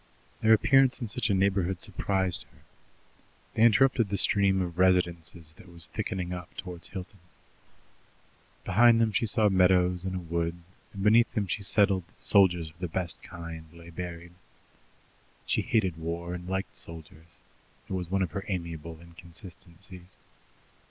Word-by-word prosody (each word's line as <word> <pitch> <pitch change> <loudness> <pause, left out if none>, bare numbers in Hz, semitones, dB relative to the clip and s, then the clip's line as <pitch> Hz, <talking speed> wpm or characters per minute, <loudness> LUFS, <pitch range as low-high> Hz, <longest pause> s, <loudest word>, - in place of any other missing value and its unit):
Their 110 0 +6
appearance 135 +3 +4
in 120 - -3
such 115 0 -1
a 100 - +2
neighbourhood 95 -1 +1
surprised 95 -2 -1
her. - - -24 0.9
They 110 - -1
interrupted 115 -1 +4
the 100 - -1
stream 95 0 +4
of 90 -1 -4
residences 85 -3 +1
that 90 - -15
was 85 -1 -4
thickening 95 -4 -3
up 90 -2 -9
towards 90 -2 -5
Hilton. 95 +1 -8 1.5
Beyond 115 +4 +5
them 115 -1 +2
she 110 +3 0
saw 110 0 +3
meadows 90 -2 +3
and 95 0 -3
a - - -1
wood, 85 -1 -2 0.4
and 100 -1 -6
beneath 115 +3 +5
them 105 - +1
she 100 +3 -3
settled 100 -3 +2
that - - -26
soldiers 90 -5 +3
of 85 - -27
the 90 - -3
best 85 +1 -2
kind 85 -3 -9
lay 85 0 -13
buried. 85 0 -7 1.1
She - - +1
hated 95 -7 0
war 85 +2 -4
and 90 0 -7
liked 95 0 -3
soldiers 80 -1 -8 0.5
it - - -6
was 90 -2 -3
one 95 0 +1
of 85 - -3
her 95 +4 -4
amiable 85 -3 -5
inconsistencies. 85 +2 -11
90 Hz, 155 wpm, -28 LUFS, 85-100 Hz, 1.5 s, Their